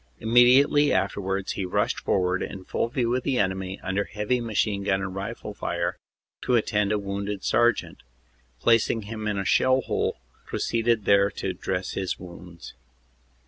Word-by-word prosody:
Immedi 120 +3 +6
ately 145 0 +2
afterwards 95 0 -1
he 100 - -3
rushed 90 - 0
forward, 90 -1 0
in 95 -1 -6
full - - -1
view 120 -1 0
of 130 - 0
the 130 0 -1
enemy, 95 -3 -1
under 95 +2 -1
heavy 105 +4 -1
machine 110 -3 0
gun 95 -1 +1
and 95 -1 -4
rifle 105 +2 -6
fire, 85 -3 -3 0.4
to 125 - +1
attend 105 -2 +1
a 105 - +2
wounded 100 0 -4
sergeant, 120 -2 +1
and - - -32
placing 115 - +2
him 110 +1 -5
in 105 -1 -1
a 100 - -2
shell 130 +6 +3
hole - - -1 0.3
proceeded 115 -2 0
there 100 0 +4
to 95 -2 -4
dress 90 +1 -3
his 95 -2 -3
wounds. 85 -1 -11
100 Hz, 165 wpm, -25 LUFS, 95-115 Hz, 0.4 s, Immedi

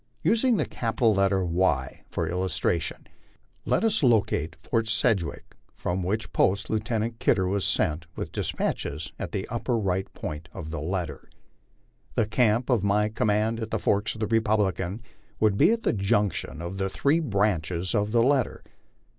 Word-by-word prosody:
Using 230 +1 +3
the - - +1
capital 115 -1 +1
letter 95 -1 +2
Y 85 -7 0
for 85 - -2
illustration, 90 -2 -1 0.6
let - - +1
us 220 -3 +2
locate 100 - +2
Fort 115 -2 0
Sedgwick, 110 -5 0 0.2
from 90 +2 -2
which 105 +5 -2
post 100 +3 +2
Lieutenant 110 +1 -1
Kidder 95 -5 +2
was 100 +1 0
sent 80 +1 0
with - - -5
despatches, 75 +3 -2
at - - -4
the - - -2 0.2
right 95 -5 0
upper - - -21
point 75 +2 -5
of 80 -5 -7
the 80 -3 -4
letter. 85 -3 -4 0.9
The 115 - +3
camp 115 +2 +2
of 115 -6 +2
my 105 +1 +2
command 110 +1 +1
at 110 -1 -4
the - - 0
forks 105 +3 0
of 110 - -9
the - - +2
Republican 105 -2 0 0.4
would 105 -2 +3
be 150 - +5
at 230 -1 0
the - - +2
junction 100 -5 0
of 90 +3 -5
the 95 0 0
three 140 - +2
branches 95 - 0
of 105 -1 +1
the 115 0 +4
letter. 130 -2 +1
105 Hz, 165 wpm, -26 LUFS, 90-115 Hz, 0.9 s, be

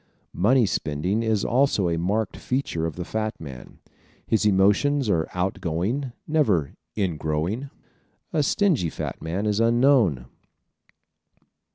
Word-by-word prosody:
Money 120 +6 +3
spending 90 +4 -1
is 110 -3 0
also 125 -6 +2
a 85 - 0
marked 95 +5 -1
feature 125 -11 -2
of 80 - -6
the 90 - -5
fat 110 +1 -3
man. 70 -5 -10 0.5
His 110 -1 +2
emotions 105 +6 +3
are 80 -3 0
out 90 +2 -1
going, 105 - -2 0.2
never 105 - +1 0.2
"in 95 -7 -1
growing." 80 - -2 0.6
A 155 - +2
stingy 150 - +2
fat - - -6
man 90 +6 -3
is 105 0 +1
unknown. 115 - +3
105 Hz, 130 wpm, -24 LUFS, 85-125 Hz, 0.6 s, Money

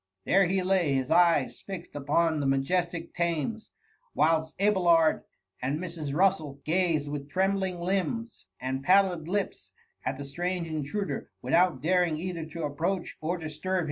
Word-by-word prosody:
There 195 -1 +4
he 190 +1 0
lay, 180 -6 +2
his 130 -1 -1
eyes 170 -6 +3
fixed 185 -5 -8
upon 155 +3 +1
the 140 - 0
majestic 165 +5 0
Thames, 170 +6 -2 0.5
whilst 160 +1 +1
Abelard 175 -6 +4 0.4
and 135 +4 -1
Mrs. 165 -4 -5
Russd 155 -5 +1
gazed 165 -3 +1
with 145 -1 -5
trembling 190 0 0
limbs 195 +6 -2
and 130 +1 -3
pallid 185 -2 +3
lips 200 +2 -3 0.3
at 130 +1 -2
the 140 - -6
strange 175 +4 -2
intruder, 160 +6 -3
without 180 0 +3
daring 175 -2 +2
either 170 -1 -4
to 165 +1 -6
approach 170 +6 -2
or 170 +3 -1
disturb 160 +3 -4
him. - - +3
170 Hz, 145 wpm, -28 LUFS, 150-185 Hz, 0.5 s, There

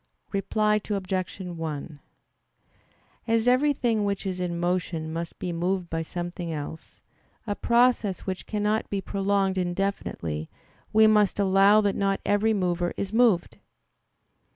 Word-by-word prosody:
Reply 210 +2 +1
Obj. 190 -2 -2
1: 160 -4 -5 1.3
As 230 +1 +2
everything 250 -4 +2
which 200 -1 -2
is 185 -1 -3
in 175 -1 -2
motion 175 -2 -1
must 165 0 -5
be 175 - -4
moved 180 +1 -1
by 165 0 -1
something 175 0 -5
else, 155 +1 -7 0.4
a 205 - -1
process 235 -5 +2
which 185 -1 -5
cannot 210 +1 0
be 200 - -1
prolonged 195 -1 0
indefinitely, 175 - -2 0.4
we 220 0 +6
must 210 -2 +4
allow 200 +1 +5
that 200 -2 0
not 195 -1 0
every 205 +2 +2
mover 175 -4 0
is 200 +1 -3
moved. 225 -7 +2
195 Hz, 130 wpm, -26 LUFS, 175-210 Hz, 1.3 s, we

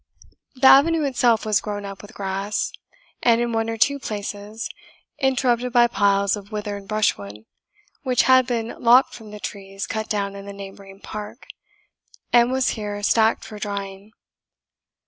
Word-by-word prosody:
The 260 +1 0
avenue 310 +4 +6
itself 245 -5 +2
was 215 -2 +2
grown 205 -1 -5
up 195 0 -8
with 210 +2 -14
grass, 195 +1 -2 0.5
and, 230 -1 +4
in 240 0 0
one 225 0 0
or 225 - -3
two 280 +5 +2
places, 210 -1 -5 0.5
interrupted 250 -2 +1
by 240 -1 +6
piles 200 -3 +2
of 205 0 -11
withered 205 -2 -5
brushwood, 105 - -1 0.6
which 255 -4 +2
had 260 -1 +5
been 230 -2 -2
lopped 245 +3 +5
from 220 -3 -11
the 210 0 -9
trees 195 -1 -6
cut 220 0 -4
down 200 -1 -2
in 200 0 -9
the 200 - -7
neighbouring 195 0 -11
park, 210 +4 -8 0.9
and 240 +1 +5
was 260 0 +1
here 205 -2 -4
stacked 220 +1 +2
for 210 - -9
drying. 200 0 -6
215 Hz, 155 wpm, -22 LUFS, 200-240 Hz, 0.9 s, avenue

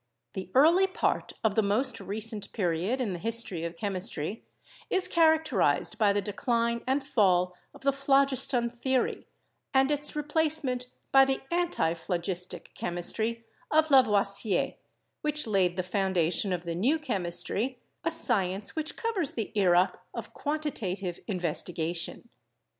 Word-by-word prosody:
The 185 -1 -6
early 335 +8 +6
part 375 - -1
of 220 -2 +2
the 220 - +3
most 225 +5 +1
recent 210 +1 -5
period 185 +5 -1
in 225 -7 -1
the 175 - -5
history 225 -5 +2
of 170 0 -4
chemistry 195 -1 +1 0.5
is 380 -1 +2
characterized 315 - +2
by 210 -2 +4
the 200 0 0
decline 235 +2 -1
and 265 +1 0
fall 185 -8 +2 0.2
of - - -16
the 275 +1 +3
phlogiston 270 -3 +2
theory 255 +1 -1 0.5
and 265 +2 +4
its 295 0 -1
replacement 295 -4 0 0.2
by 270 0 +7
the 270 0 -1
anti 340 - +1
phlogistic 175 +1 -4
chemistry 220 +7 -1 0.2
of 315 0 +2
Lavoisier, 205 -6 +3 0.5
which 300 0 -1
laid 190 -5 +1
the 185 - 0
founda 185 -3 0
tion 195 +4 -1
of 175 -1 -2
the 170 -1 -4
new 240 - +2
chemistry, 210 - -1 0.3
a 330 - +1
science 200 - 0
which 315 0 -3
covers 410 - -2
the 225 -3 -3
era 180 -2 +4 0.2
of - - -7
quantitative 210 - -3
investigation. 175 0 -2
220 Hz, 135 wpm, -28 LUFS, 185-275 Hz, 0.5 s, by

